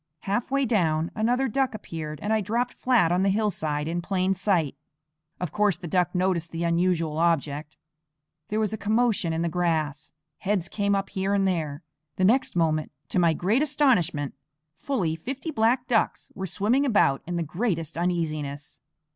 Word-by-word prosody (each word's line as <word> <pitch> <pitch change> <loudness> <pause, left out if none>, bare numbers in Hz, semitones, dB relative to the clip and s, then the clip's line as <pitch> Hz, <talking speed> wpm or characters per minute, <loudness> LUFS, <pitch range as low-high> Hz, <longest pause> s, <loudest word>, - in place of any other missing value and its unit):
Halfway 245 +7 0
down, 165 -8 +1
another 245 +5 +1
duck 260 0 0
appeared, 155 -7 -6
and 210 +2 +1
I 220 - +2
dropped 235 +5 -1
flat 240 -10 +2
on 180 +1 +2
the 195 - +3
hillside 170 -8 0
in 170 +1 -2
plain 185 +1 0
sight. 180 -7 +1 0.6
Of 180 -4 -3
course 210 -3 +2
the 175 - -7
duck 180 +2 +1
noticed 180 -2 +1
the 165 +1 -4
unusual 170 -2 +1
object. 150 -3 0 0.7
There 215 - -1
was 215 -1 0
a 220 - -4
commotion 215 -4 +1
in 160 +1 -1
the - - +1
grass; 160 -4 -1 0.3
heads 195 -3 0
came 200 -1 +1
up 195 0 -2
here 195 0 0
and 195 -1 +2
there. 160 -4 -2 0.3
The 185 - +2
next 245 +3 +2
moment, 155 -2 +1 0.2
to - - +1
my 170 -2 +4
great 200 - +1
astonishment, 240 - +2 0.4
fully 180 - -1
fifty 270 - -5
black 240 +1 +2
ducks 225 -4 0
were 190 -1 -4
swimming 215 - +1
about 210 - +3
in 175 - -3
the 170 - 0
greatest 165 -1 -2
uneasiness. 155 -5 -3
185 Hz, 170 wpm, -26 LUFS, 165-215 Hz, 0.7 s, my